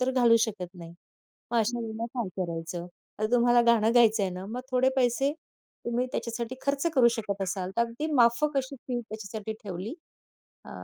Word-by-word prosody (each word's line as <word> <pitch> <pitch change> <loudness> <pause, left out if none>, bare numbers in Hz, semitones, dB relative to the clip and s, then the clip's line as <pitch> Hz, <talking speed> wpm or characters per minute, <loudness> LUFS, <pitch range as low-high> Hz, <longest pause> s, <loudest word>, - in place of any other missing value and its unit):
तर 255 +1 +2
घालू 240 -3 +5
शकत 200 -6 -1
नाही. 170 -1 -10 0.6
मग 235 - +2
अशा 235 +2 +1
वेळेला 225 0 -4
काय 220 -6 -1
करायचं? 170 0 -4 0.3
आता 215 - +1
तुम्हाला 240 0 +5
गाणं 230 0 +4
गायचं 225 -3 +5
आहे 190 - 0
ना, 185 +1 -6
मग 240 +4 -4
थोडे 255 +1 +3
पैसे 260 +3 +2 0.5
तुम्ही 240 +2 0
त्याच्यासाठी 235 +1 -3
खर्च 280 +3 0
करू 245 -3 +6
शकत 200 -3 -3
असाल, 185 0 -2
तर - - +3
अगदी 235 +6 -3
माफक 270 +4 +3
अशी 270 +1 -4
फी 245 -1 -1
त्याच्यासाठी 215 -1 -6
ठेवली. 200 - -5 0.7
अ, - - -11
230 Hz, 175 wpm, -28 LUFS, 200-245 Hz, 0.7 s, करू